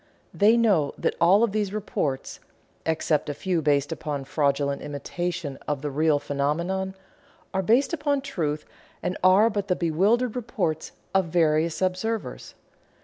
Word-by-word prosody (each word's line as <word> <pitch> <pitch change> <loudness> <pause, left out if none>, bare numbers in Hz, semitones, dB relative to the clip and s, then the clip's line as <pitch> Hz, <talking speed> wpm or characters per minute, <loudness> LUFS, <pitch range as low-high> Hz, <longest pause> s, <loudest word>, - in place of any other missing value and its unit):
They 215 +3 +5
know 195 -11 +2
that - - 0
all 190 +6 +6
of 230 - +2
these 205 -2 -1
reports 175 -10 -3 0.5
(except 155 -2 0
a 145 - -3
few 180 -1 -1
based 145 -1 +1
upon 150 -3 -3
fraudulent 140 -1 0
imitation 160 +1 -4
of 145 -1 -2
the 145 - -2
real 155 +1 +3
phenomenon) 170 +7 -2 0.6
are 190 - +1
based 240 - +2
upon 290 -3 0
truth 160 - -3 0.4
and 180 - -1
are 190 +4 +6
but 205 -1 -2
the 180 - +2
bewildered 200 +9 +1
reports 210 -10 -2 0.2
of 190 -1 +3
the 170 +1 -4
various 160 +2 +2
observers. 195 +4 -3
175 Hz, 145 wpm, -25 LUFS, 150-205 Hz, 0.6 s, all